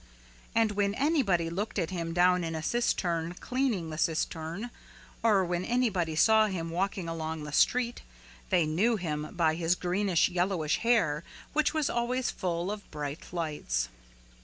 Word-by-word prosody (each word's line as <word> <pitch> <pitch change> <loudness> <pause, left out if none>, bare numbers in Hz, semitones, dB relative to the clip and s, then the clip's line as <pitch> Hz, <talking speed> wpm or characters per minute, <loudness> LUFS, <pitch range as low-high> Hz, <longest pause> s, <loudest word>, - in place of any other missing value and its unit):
And 225 -2 +3
when 200 0 0
anybody 220 - +2
looked 205 +5 -3
at 165 - -1
him 170 -2 -3
down 180 +1 +3
in 165 -1 -3
a 160 - -4
cistern 175 -7 0
cleaning 245 -11 -1
the 155 - -5
cistern 165 +7 -2 0.5
or 205 -5 +4
when 175 0 -1
anybody 195 -9 0
saw 220 +6 +5
him 165 -4 -3
walking 185 0 -1
along 160 -1 -4
the 150 - -6
street 240 +9 +2 0.5
they 180 -4 +3
knew 190 +10 +2
him 155 -6 -3
by 165 -2 +3
his 170 +1 +1
greenish 180 0 +2
yellowish 180 -3 0
hair 190 -11 +2 0.3
which 310 +1 +2
was 310 -3 +2
always 240 +1 0
full 175 0 -2
of 210 -1 -7
bright 150 0 -6
lights. 150 - -2
180 Hz, 155 wpm, -29 LUFS, 165-215 Hz, 0.5 s, saw